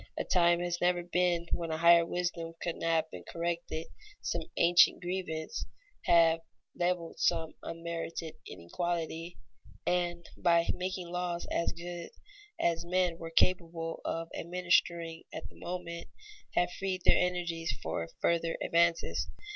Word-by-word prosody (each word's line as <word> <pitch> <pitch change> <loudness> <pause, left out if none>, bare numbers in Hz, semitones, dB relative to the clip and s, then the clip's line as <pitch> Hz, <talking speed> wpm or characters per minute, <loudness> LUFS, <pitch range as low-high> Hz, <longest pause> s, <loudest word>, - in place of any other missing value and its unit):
A - - 0
time 175 -1 +4
has 175 0 -2
never 175 0 +3
been 175 -1 +1
when 170 -1 -1
a 160 - -1
higher 170 +1 +7
wisdom 170 -1 -2
could 170 - -2
not 165 -1 +2
have - - -8
corrected 170 -1 -2 0.3
some - - -2 0.2
ancient 175 +1 +6
grievance, 175 +1 -3 0.4
have 165 -1 +6 0.4
leveled 175 -1 -1
some 165 -2 +1
unmerited 165 -1 -4
inequality, 165 - -3 0.5
and, 175 -1 0
by 170 -1 +4
making 185 -1 -3
laws 175 -1 -2
as 170 - +1
good 175 0 -6 0.5
as 165 -1 +1
men 180 -1 +1
were 165 - -5
capable 165 -1 +1
of 165 0 -2
administering 170 -1 +1
at - - -6
the - - -20
moment, 170 -1 -5 0.5
have 175 0 +3
freed 190 -2 -2
their - - +6
energies 175 -2 0
for 80 +1 -2
further 170 -1 +1
advances. 170 0 +2
170 Hz, 130 wpm, -31 LUFS, 165-175 Hz, 0.5 s, higher